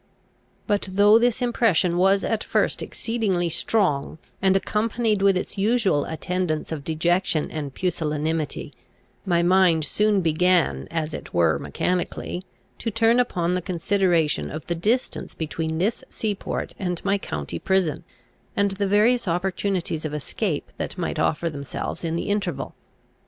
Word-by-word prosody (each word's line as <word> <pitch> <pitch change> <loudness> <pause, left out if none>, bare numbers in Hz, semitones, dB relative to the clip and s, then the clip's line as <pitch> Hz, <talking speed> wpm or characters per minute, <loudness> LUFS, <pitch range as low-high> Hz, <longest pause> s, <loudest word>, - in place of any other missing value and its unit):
But 205 -3 0
though 205 +3 +6
this 245 +1 +1
impression 215 -8 +2
was 195 +2 +3
at 220 -1 -1
first - - +1
exceedingly 200 -7 -1
strong, 160 -6 0 0.2
and 190 0 +4
accompanied 215 +1 0
with 195 -1 +4
its 190 - -4
usual 205 -8 +2
attendants 165 -1 -2
of 155 -3 -4
dejection 165 +1 0
and 150 -3 -4
pusillanimity, 155 -2 -2 0.5
my 170 -2 +3
mind 175 -3 +4
soon 210 +3 +2
began, 175 +2 +2
as 160 -2 -2
it - - -7
were 80 -4 +3
mechanically, 180 - -2 0.4
to 230 - -2
turn 230 +2 +3
upon 180 -8 +1
the 180 - 0
consideration 175 -2 +1
of 155 0 -6
the 175 - -1
distance 215 +10 -1
between 160 +1 -3
this 200 +7 0
sea 215 -2 -1
port 195 - -4
and 180 -2 -3
my 200 0 +2
county 75 - -4
prison, 185 -4 +1 0.5
and 200 0 +2
the 195 +1 -1
various 215 +4 +3
opportunities 180 -1 -1
of 155 -1 -3
escape 150 - -3
that - - -4
might - - -2
offer 165 +2 +1
themselves 140 0 -5
in 165 -1 -1
the 170 - -2
interval. 185 -9 -2
180 Hz, 145 wpm, -24 LUFS, 160-205 Hz, 0.5 s, though